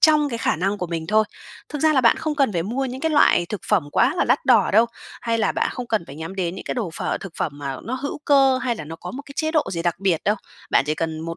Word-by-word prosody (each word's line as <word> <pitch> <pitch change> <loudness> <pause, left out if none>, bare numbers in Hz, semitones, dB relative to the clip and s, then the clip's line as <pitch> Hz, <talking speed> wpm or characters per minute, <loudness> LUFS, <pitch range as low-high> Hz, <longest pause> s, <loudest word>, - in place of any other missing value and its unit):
trong 305 -2 +5
cái 235 -4 -4
khả 230 - +1
năng 195 +4 -1
của 180 - -2
mình 165 -1 -4
thôi. 215 +2 +3 0.4
Thực 295 - -5
ra 315 -1 +5
là 265 - +4
bạn 235 -2 +5
không 310 -2 -2
cần 275 -6 +2
phải 170 -3 0
mua 245 +8 -2
những 260 0 -5
cái 320 +1 0
loại 290 - +4
thực 210 +2 -5
phẩm 185 -9 +2
quá 275 - +3
là - - +2
đắt 250 +4 +2
đỏ 235 -6 +5
đâu, 225 +3 +6 0.3
hay 230 -1 0
là 220 - +1
bạn - - 0
không 250 -1 -5
cần 220 -7 0
phải 135 - -10
nhắm 160 +4 -6
đến 175 -1 -1
những - - -8
cái - - -3
đồ 215 -8 -2
phở, - - -2
thực 195 - -8
phẩm 150 - -1
mà 140 -2 -4
nó 245 - -3
hữu 280 +3 -4
cơ, 270 -2 +5
hay 245 -2 -1
là 160 - -7
nó 160 +2 -8
có 180 - -8
một 280 +3 -7
cái 280 - -10
chế 315 0 0
độ 310 -2 +3
gì 170 - -2
đặc 175 -1 +1
biệt 190 -5 0
đâu, 210 +1 +2 0.3
bạn - - +4
chỉ 155 - 0
cần 160 -1 -3
một 165 +1 -5
220 Hz, 310 wpm, -22 LUFS, 170-265 Hz, 0.4 s, đâu